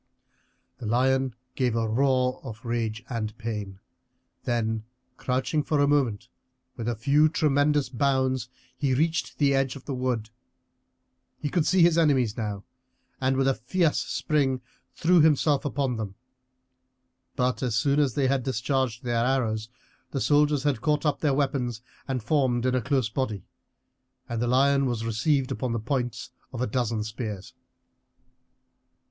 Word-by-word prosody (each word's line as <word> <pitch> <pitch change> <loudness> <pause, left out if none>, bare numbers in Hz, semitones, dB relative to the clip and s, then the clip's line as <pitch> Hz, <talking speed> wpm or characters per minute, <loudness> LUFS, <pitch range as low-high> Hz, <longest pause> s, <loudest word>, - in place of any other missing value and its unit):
The 115 - -5
lion 130 +2 +2 0.2
gave 125 -4 0
a 115 -1 0
roar 130 +2 +1
of 115 -2 -9
rage 115 -1 -2
and 110 -4 -4
pain, 105 -4 -5 0.7
then, 110 -2 -1 0.3
crouching 130 +4 0
for 150 0 0
a 145 - +5
moment, 125 -7 +1 0.5
with 115 -2 -5
a 120 - -1
few 140 +7 +3
tremendous 145 -1 +2
bounds 130 -1 0 0.3
he 130 0 0
reached 160 +4 0
the 140 -2 +3
edge 135 -1 +1
of 135 - -11
the 140 - -3
wood. 125 -4 -2 1.1
He 145 - -3
could 165 -1 +1
see 185 -1 +5
his 170 -1 +5
enemies 130 -9 +3
now, 105 -4 -4 0.6
and 130 0 +1
with 135 0 +2
a 135 - +4
fierce 150 +7 +1
spring 135 -4 0 0.3
threw 175 +1 +4
himself 150 -1 +3
upon 135 -4 -1
them. 105 -3 -5 1.2
But 125 0 0
as 125 -4 0
soon 140 +5 +2
as 140 -6 +1
they 135 -2 +2
had 135 0 +1
discharged 130 -1 -1
their 120 -1 +1
arrows 115 -4 0 0.4
the 135 - -3
soldiers 145 0 +3
had 145 -6 0
caught 150 0 +1
up 150 -2 +1
their 145 -3 +1
weapons 130 -5 -1 0.2
and 130 -4 -2
formed 125 -2 +1
in 130 - +2
a 130 - +1
close 130 -1 +1
body, 110 -6 -3 0.8
and 115 -1 -3
the 120 - +1
lion 135 +2 +3
was 115 -2 -2
received 130 +4 +1
upon 125 -3 -2
the 115 - -1
points 120 0 -3 0.2
of 120 - -6
a 125 - +1
dozen 115 -2 -1
spears. 105 -3 -6
130 Hz, 155 wpm, -26 LUFS, 115-140 Hz, 1.2 s, a